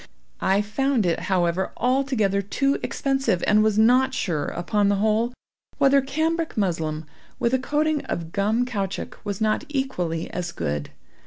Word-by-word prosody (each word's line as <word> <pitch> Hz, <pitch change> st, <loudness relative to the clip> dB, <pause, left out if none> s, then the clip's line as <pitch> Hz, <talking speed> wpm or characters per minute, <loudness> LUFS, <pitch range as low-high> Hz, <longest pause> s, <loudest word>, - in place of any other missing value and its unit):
I 195 Hz, +2 st, +2 dB
found 235 Hz, +2 st, 0 dB
it, 170 Hz, -2 st, +1 dB
however, 180 Hz, 0 st, +1 dB
altogether 250 Hz, -6 st, +1 dB
too 275 Hz, +8 st, 0 dB
expensive, 270 Hz, -10 st, 0 dB
and 210 Hz, +1 st, +4 dB
was 215 Hz, -1 st, +2 dB
not 250 Hz, +4 st, +4 dB
sure, 160 Hz, -7 st, -1 dB
upon 200 Hz, +3 st, 0 dB
the 205 Hz, -, +3 dB
whole, 220 Hz, +4 st, +1 dB, 0.5 s
whether 275 Hz, -1 st, +5 dB
cambric 315 Hz, +4 st, -1 dB
muslin 160 Hz, -6 st, -1 dB, 0.3 s
with 235 Hz, -, 0 dB
a 260 Hz, -, +3 dB
coating 300 Hz, +3 st, 0 dB
of 165 Hz, -1 st, -4 dB
gum 215 Hz, +6 st, +1 dB
caoutchouc, 200 Hz, -6 st, -4 dB
was 200 Hz, -2 st, -4 dB
not 215 Hz, 0 st, +1 dB
equally 180 Hz, -, -2 dB
as 175 Hz, 0 st, -3 dB
good. 70 Hz, 0 st, -3 dB
215 Hz, 150 wpm, -24 LUFS, 185-265 Hz, 0.5 s, whether